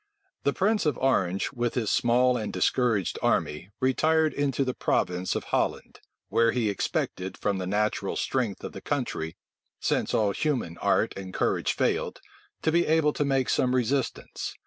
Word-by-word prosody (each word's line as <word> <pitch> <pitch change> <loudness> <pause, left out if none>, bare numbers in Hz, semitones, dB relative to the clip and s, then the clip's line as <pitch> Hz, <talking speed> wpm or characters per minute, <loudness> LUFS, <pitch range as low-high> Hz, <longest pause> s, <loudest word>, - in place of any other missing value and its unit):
The 140 - +4
prince 210 -2 +1
of 145 - +1
Orange, 95 -8 +1
with 120 -3 -2
his 115 -5 0
small 125 +1 +3
and 110 -3 -3
discouraged 115 -8 +1
army, 75 +5 0
retired 155 +4 +2
into 140 -1 0
the 130 - -1
province 90 -5 0
of - - -2
Holland; - - -2 0.3
where 115 0 +3
he 115 -4 +1
expected, 95 -1 -2
from 100 -2 -1
the 90 - -3
natural 105 0 0
strength 120 -7 -1
of - - -5
the 95 - -9
country, 120 - -3 0.4
since - - 0
all 105 -2 +2
human 120 - -2
art - - +2
and 95 -1 -7
courage - - 0
failed, - - 0 0.4
to 160 - +2
be 170 +1 +2
able 155 -1 +3
to - - 0
make 135 -2 +1
some 125 0 +2
resistance. 130 +2 -2
125 Hz, 165 wpm, -27 LUFS, 100-140 Hz, 0.4 s, The